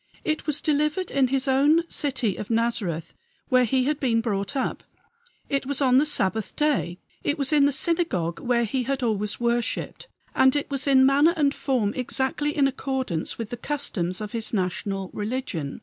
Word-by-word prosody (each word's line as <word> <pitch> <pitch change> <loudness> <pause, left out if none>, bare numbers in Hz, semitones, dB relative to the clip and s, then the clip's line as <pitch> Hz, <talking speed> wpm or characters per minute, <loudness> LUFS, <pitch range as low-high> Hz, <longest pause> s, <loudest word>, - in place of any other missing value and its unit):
It 310 +1 -2
was 300 -1 0
delivered 300 +4 0
in 275 -2 +3
his 270 +1 0
own 295 +6 +4
city 255 - -1
of 210 - -7
Nazareth, 225 -8 -1 0.4
where 255 -1 +4
he 260 +2 +2
had 295 +2 0
been 235 -4 +2
brought 205 0 -2
up; 265 - -2 0.6
it 275 -2 -1
was 280 -1 -1
on 260 -2 +5
the 300 - +2
Sabbath 220 -6 -2
day; 285 -13 0 0.3
it 290 - 0
was 280 +1 -1
in 285 -2 +5
the - - +2
synagogue 270 - -1
where 240 -1 +1
he 255 +4 -1
had 265 +1 -2
always 210 -3 -1
worshiped; 240 - -1 0.3
and 265 +1 +4
it 290 0 -2
was 275 +1 -2
in 265 -1 +6
manner 290 +5 +4
and 285 -2 +3
form 240 -7 0
exactly 265 +4 -1
in 280 -2 +4
accordance 260 - -3
with 230 -2 -5
the 240 - -4
customs 220 -10 -2
of 210 - -5
his 230 -2 -3
national 195 -1 -2
religion. 210 - -3
260 Hz, 180 wpm, -25 LUFS, 220-285 Hz, 0.6 s, in